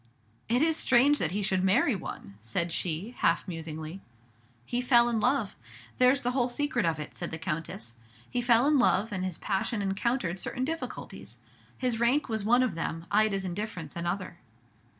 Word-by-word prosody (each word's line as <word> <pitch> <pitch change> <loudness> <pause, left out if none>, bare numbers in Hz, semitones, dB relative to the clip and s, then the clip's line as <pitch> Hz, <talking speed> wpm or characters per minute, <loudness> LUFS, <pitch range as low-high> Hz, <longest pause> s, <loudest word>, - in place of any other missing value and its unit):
"It 245 +5 +3
is 320 0 +2
strange 265 +4 +4
that 160 - +1
he 200 +4 -2
should 190 -1 +1
marry 215 +6 +3
one!" 165 - -7
said 115 +11 -1
she, 175 +6 -2
half 170 +3 +2
musingly. 160 +1 -6 0.6
"He 245 - -1
fell 240 -1 +5
in 235 -2 0
love, 250 -2 +1 0.4
there's 255 +2 +4
the 245 - +1
whole 250 -1 +1
secret 290 - 0
of 165 -1 0
it," 150 - -7
said 175 - -5
the 160 - -5
Countess. 155 -7 -5 0.3
"He 245 - -2
fell 240 +1 +4
in 295 -1 +4
love, 225 -3 +2
and 185 -2 -3
his 185 -3 -3
passion 210 +3 -1
encountered 195 -1 -1
certain 255 +7 -3
difficulties. 325 +3 -6 0.4
His 245 -3 -1
rank 250 +6 +2
was 220 -2 -2
one 245 +4 +4
of 255 - 0
them, 165 0 -4
Ida's 205 -2 +2
indifference 180 -4 -5
another." 175 +1 -3
205 Hz, 175 wpm, -29 LUFS, 175-245 Hz, 0.6 s, fell